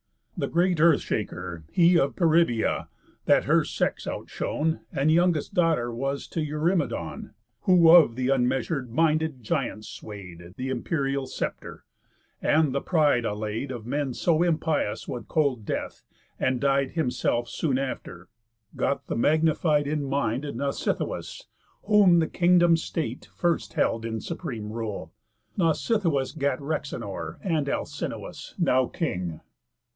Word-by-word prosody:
The - - -2
great 175 0 +1
Earth 165 -1 +5
shaker, 90 -6 -4
he 175 0 +5
Of 135 - 0
Peribœa 165 -9 +2 0.4
(that - - +4
her - - +3
sex - - -2
out - - -5
shone, 160 +2 -1
And 145 +3 +2
youngest 170 -2 +2
daughter 160 -9 +1
was 135 +4 -3
t' 165 - -3
Eurymedon, 155 +4 -2 0.3
Who 180 -4 +6
of 165 -9 +7
th' 130 +1 0
unmeasur'd 130 +1 0
minded 155 0 +1
giants 110 -5 -2
sway'd 90 -5 -10
Th' - - -7
imperial 135 +1 -1
sceptre, - - -5 0.6
and 155 -3 +3
the 140 - 0
pride 150 -8 +2
allay'd 110 +4 -3
Of 120 -4 -6
men 135 0 -2
so 165 -2 +2
impious 160 -9 0
with 120 - -6
cold 140 -8 +1
death, - - -4 0.4
and 130 -1 +1
died 140 0 +1
Himself 125 -5 0
soon 135 -1 -1
after) 90 -9 -5 0.5
got - - -1
the - - -3
magnified 155 +2 +2
In 150 0 -1
mind, 135 -1 -1
Nausithous; 140 -1 -3 0.4
whom 200 -4 +5
the 160 -1 +2
kingdom's 175 -2 +4
state 140 -9 -4
First 170 -2 0
held 115 - +1
in 115 -1 -3
supreme 120 -11 -5
rule. 110 -3 -5 0.4
Nausithous 165 - +1
gat 140 -3 0
Rhexenor, 115 - -4
and 155 -6 0
Alcinous, - - -5
now 130 0 +3
king. 90 - -3
140 Hz, 130 wpm, -26 LUFS, 120-165 Hz, 0.6 s, of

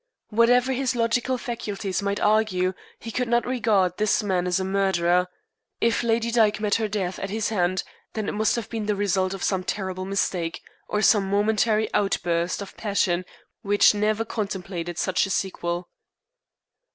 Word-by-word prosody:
Whatever 245 +4 +3
his 260 0 -1
logical 240 +2 +1
faculties 215 -5 -3
might 200 0 -1
argue, 210 -4 +2 0.2
he 230 - -8
could 250 +2 -1
not 235 +1 +2
regard 210 -8 +1
this 215 +1 +2
man 185 -3 0
as 180 +1 +1
a - - -1
murderer. 180 -2 +2 0.5
If 230 0 +2
Lady 235 0 +1
Dyke 220 -3 +3
met 210 -1 0
her 220 - +1
death 195 -3 -3
at 195 - -4
his 215 +1 -1
hand 185 -3 0 0.3
then 215 -2 -3
it - - 0
must 215 +1 +1
have 235 -3 -4
been 220 -2 -4
the 210 - +1
result 190 -1 0
of 190 - -7
some 190 -2 0
terrible 185 -1 -3
mistake 185 -3 -2 0.3
of 210 -1 +1
some 200 -3 +4
momentary 215 +2 +2
outburst 175 -2 0
of 195 - -12
passion 190 -4 0 0.4
which 205 -2 +4
never 215 +2 0
contemplated 190 -6 -4
such 185 0 +1
a - - -8
sequel. 175 -2 -2
205 Hz, 165 wpm, -24 LUFS, 185-220 Hz, 0.5 s, some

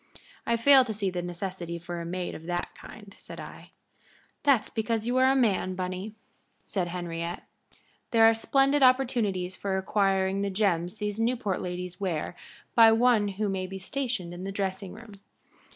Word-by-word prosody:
"I 235 - +2
fail 265 +3 +7
to 220 -3 -4
see 200 -2 -1
the 180 -1 -3
necessity 175 -1 -5
for 170 0 -6
a 170 - -6
maid 180 +1 -3
of 160 - -9
that 175 0 -3
kind," 205 -2 -13
said - - -10
I. - - -10 0.7
"That's 275 -6 +3
because 225 0 -1
you 245 +2 0
are 260 +1 +5
a - - +2
man, 200 -7 +1
Bunny," 185 +3 -4 0.5
said 185 -4 -2
Henriette. 170 -1 -4 0.7
"There 225 -1 +5
are 225 - +7
splendid 275 +5 +2
opportunities 235 -8 +2
for 195 -1 -2
acquiring 195 0 +1
the 200 - 0
gems 185 -3 0
these 210 0 -4
Newport 230 -4 0
ladies 180 +1 -5
wear 175 -3 -2 0.4
by 225 -2 +8
one 225 -2 +4
who 205 +2 -2
may 190 -1 -2
be 190 +1 -7
stationed 225 - -3
in 175 +1 -7
the 195 - -4
dressing 195 -1 -3
room. 225 0 -12
195 Hz, 170 wpm, -28 LUFS, 180-225 Hz, 0.7 s, by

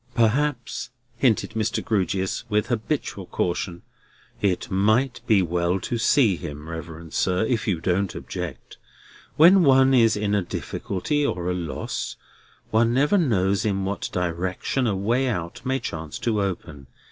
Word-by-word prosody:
"Perhaps," 120 +2 0 0.3
hinted 120 -2 +2
Mr. 110 -1 -1
Grewgious, 95 -2 0
with 105 0 +1
habitual 115 - -2
caution, 85 0 -2 0.6
"it 95 -3 0
might 110 +7 +2
be 100 -4 +4
well 85 +2 0
to 120 - -2
see 110 - +4
him, 75 +1 -7
reverend 80 0 -8
sir, 90 +3 +1
if 115 -2 -1
you 90 -6 +1
don't 90 +3 0
object. - - -7 0.6
When 180 +5 +7
one 135 -3 +5
is 115 -4 +4
in 105 0 -1
a 100 - +3
difficulty 100 +9 -2
or 90 -9 -1
at - - -1
a - - -2
loss, 85 -4 -4 0.6
one 115 +2 +3
never 145 +9 +3
knows 100 - +1
in 100 -3 0
what 100 +1 -3
direction 90 +8 -1
a 100 - +1
way 120 +7 +1
out 90 -7 -4
may 130 +1 +1
chance 80 - -5
to 110 -3 0
open. 85 -8 -4
100 Hz, 150 wpm, -24 LUFS, 90-120 Hz, 0.6 s, When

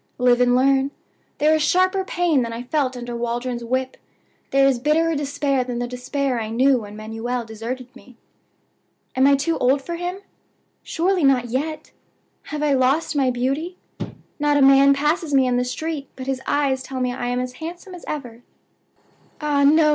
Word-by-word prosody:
Live 245 -1 +3
and 245 0 +4
learn. 270 +1 +3 0.5
There 305 +2 +3
is 315 - +2
sharper 370 +5 +2
pain 350 -6 +1
than 230 -1 -3
I 230 +1 -5
felt 260 -1 -1
under 240 0 -6
Waldron's 240 +1 -3
whip; 260 +2 -2 0.5
there 275 0 +4
is 265 -3 +2
bitterer 315 +5 +2
despair 285 -2 0
than 245 -1 -4
the 245 0 -2
despair 250 0 -2
I 215 - -4
knew 255 +3 +3
when 210 -1 -9
Manuel 225 +3 -4
deserted 235 +3 -7
me. 255 -2 -16 1.0
"Am 265 +1 +4
I 280 - +6
too 320 +4 -1
old 260 +3 +3
for 340 +3 -4
him? 355 +3 -4 0.6
Surely 360 +1 0
not 255 -3 +3
yet! 300 +6 -3 0.5
Have 300 0 -4
I 295 -2 +3
lost 275 +5 +1
my 270 -2 +2
beauty? 275 +9 -2 0.6
Not 295 0 +2
a 280 - +4
man 275 +1 +6
passes 300 +1 0
me 265 -1 +5
in 250 -1 +1
the 250 - +2
street 295 +3 -4
but 260 - -7
his 265 -1 -2
eyes 275 -2 +1
tell 260 0 -6
me 250 -1 0
I 245 -1 -4
am 245 0 -1
as 250 0 -4
handsome 350 +4 -7
as 355 - -10
ever. 245 -6 -6 1.0
"Ah, 295 -2 +1
no! 305 +2 +5
270 Hz, 185 wpm, -22 LUFS, 250-300 Hz, 1.0 s, I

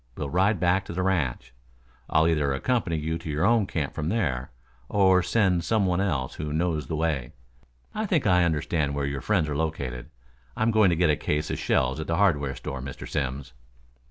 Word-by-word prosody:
We'll 70 - -4
ride 95 +2 +2
back 90 +2 +2
to - - -7
the 90 +1 -1
ranch. 80 -12 -1 0.6
I'll 80 +1 +3
either 75 -4 +1
accompany 105 - 0
you 80 +2 -2
to 85 - -8
your 75 +4 0
own 115 -2 +3
camp 75 -7 -3
from 80 0 -3
there, 70 - -1 0.4
or 95 -2 +4
send 95 -2 +1
some 110 +2 +1
one 90 0 +1
else 75 -10 -1
who 75 -1 -5
knows 80 0 -1
the 80 - -3
way. 75 -6 -1 0.6
I 215 0 -2
think 170 -7 +1
I 90 -3 +4
understand 75 -3 0
where 70 -1 -1
your 70 -1 -3
friends 95 -7 +1
are 75 - -3
located. 70 -6 -3 0.5
I'm 115 +1 +2
going 110 -3 +5
to 85 - +2
get 85 -1 +3
a - - +2
case 75 +1 -2
of - - -3
shells 65 +3 +1
at 80 - -5
the 80 - 0
hardware 75 -9 +2
store, 70 -1 -6
Mr. 65 0 -7
Simms." 65 -1 -3
80 Hz, 205 wpm, -26 LUFS, 70-95 Hz, 0.6 s, going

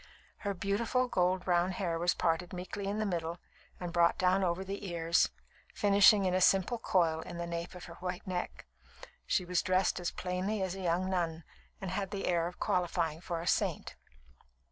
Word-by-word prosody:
Her 200 -2 -3
beautiful, 225 +7 0
gold 185 -3 +1
brown 180 +1 +2
hair 170 -3 -2
was 175 +1 +2
parted 170 +1 0
meekly 185 +2 -5
in 205 +1 -1
the 215 - 0
middle 170 -3 -2 0.4
and 175 -2 -5
brought 170 -1 +4
down 185 +1 +3
over 180 +1 0
the 195 0 -5
ears, 170 0 +2 0.5
finishing 200 0 +6
with 180 - +1
a 185 - +2
simple 195 +6 +3
coil 165 -6 +2
in 175 +1 -8
the 170 - -3
nape 170 +1 -5
of 180 - -9
her - - -10
white 180 0 -4
neck. 180 -1 -4 0.6
She 180 - +1
was 180 0 +1
dressed 185 0 +1
as 175 - -1
plainly 185 +3 -2
as 185 -2 -2
a 195 - -6
young 180 +1 +1
nun, 170 -3 -1 0.4
and 190 -3 -4
had 195 0 -2
the 200 -2 -4
air 170 -2 +1
of 180 - -9
qualifying 170 -3 0
for 170 -2 -3
a - - -6
saint. - - 0
180 Hz, 190 wpm, -32 LUFS, 170-195 Hz, 0.6 s, finishing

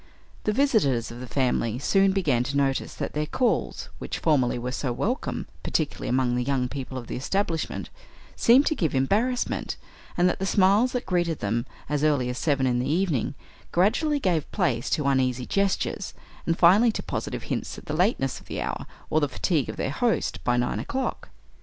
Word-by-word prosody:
The 215 - +3
visitors 210 - +2
of 120 - -9
the 125 - -7
family 120 -3 0
soon 195 +8 +3
began 150 -11 +1
to 140 +2 -2
notice 135 -1 0
that - - -4
their 150 0 -1
calls, 250 +9 0
which - - -4
formerly 130 -7 +2
were 125 +1 -3
so 130 0 -2
welcome, 230 - -2 0.2
particularly 155 -3 -2
among 125 -1 +1
the 125 - 0
young 130 -1 0
people 130 0 -6
of 125 - -6
the - - -5
establishment, 165 +4 -2 0.4
seemed 255 +5 +5
to - - +2
give 160 - 0
embarrassment, 215 - 0 0.4
and 175 +1 +4
that 180 - 0
the 195 - -1
smiles 200 +6 +4
that 250 - -2
greeted 175 -3 0
them, 115 +3 -1 0.2
as 150 0 -1
early 145 -5 +2
as 125 - -4
seven 140 -4 +1
in 125 -1 +1
the 125 - -1
evening 165 - 0 0.4
gradually 245 - +2
gave 175 - 0
place 120 -1 0
to 150 - 0
uneasy 130 -2 +1
gestures, 200 +4 -1 0.3
and, 165 0 +1
finally 200 +7 +6
to - - -4
positive - - -4
hints - - -4
at - - -11
the 150 - -4
lateness 160 - +1
of - - -19
the - - -4
hour, - - -3 0.2
or 155 - +4
the 145 -2 0
fatigue 150 +2 0
of - - -4
their 135 - -1
host 230 +9 0
by 120 0 +2
nine 120 0 0
o'clock. 265 -2 -3
150 Hz, 190 wpm, -26 LUFS, 130-195 Hz, 0.4 s, finally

